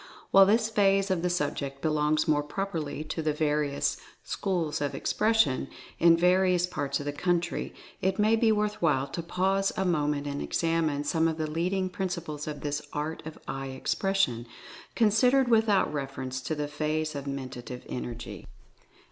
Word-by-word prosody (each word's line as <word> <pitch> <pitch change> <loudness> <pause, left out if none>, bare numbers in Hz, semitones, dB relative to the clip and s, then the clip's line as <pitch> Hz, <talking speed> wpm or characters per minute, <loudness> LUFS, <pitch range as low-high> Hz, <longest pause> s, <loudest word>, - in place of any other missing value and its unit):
While 195 0 +8
this 220 +2 +3
phase 195 -2 +2
of 180 -3 +1
the 180 - 0
sub 160 -5 0
ject 140 -1 -5
belongs 155 0 +1
more 150 -2 +3
properly 155 -2 -4
to 155 +1 -4
the 155 -1 0
various 150 -2 0 0.3
"Schools 175 -7 -2
of 145 -1 -1
Expression" 215 -11 +2 0.3
in 165 0 +6
various 180 0 +3
parts 145 -6 -2
of 145 - -6
the 145 - -1
country, 175 +2 -1 0.3
it 190 0 +1
may 215 +1 +4
be 225 0 +3
worth 210 0 0
while 150 -5 +2
to 170 - -4
pause 190 +3 +1
a 190 - +1
moment 150 -4 0
and 140 0 -3
examine 165 -3 0
some 160 +2 +2
of 160 -1 -2
the 155 - -1
leading 180 +5 -1
principles 170 -5 -4
of 150 -1 -5
this 145 0 -2
Art 150 +2 -3
of 160 - -8
Eye 135 0 -4
Expres 195 +6 0
sion, 120 -10 +1 0.5
considered 245 +4 +4
without 220 -7 +3
reference 135 -2 -4
to 155 - -3
the 150 -1 -2
phase 155 +1 -2
of 140 -1 -5
Mentative 130 -2 -6
Energy. 120 -2 -6
160 Hz, 170 wpm, -28 LUFS, 145-190 Hz, 0.5 s, While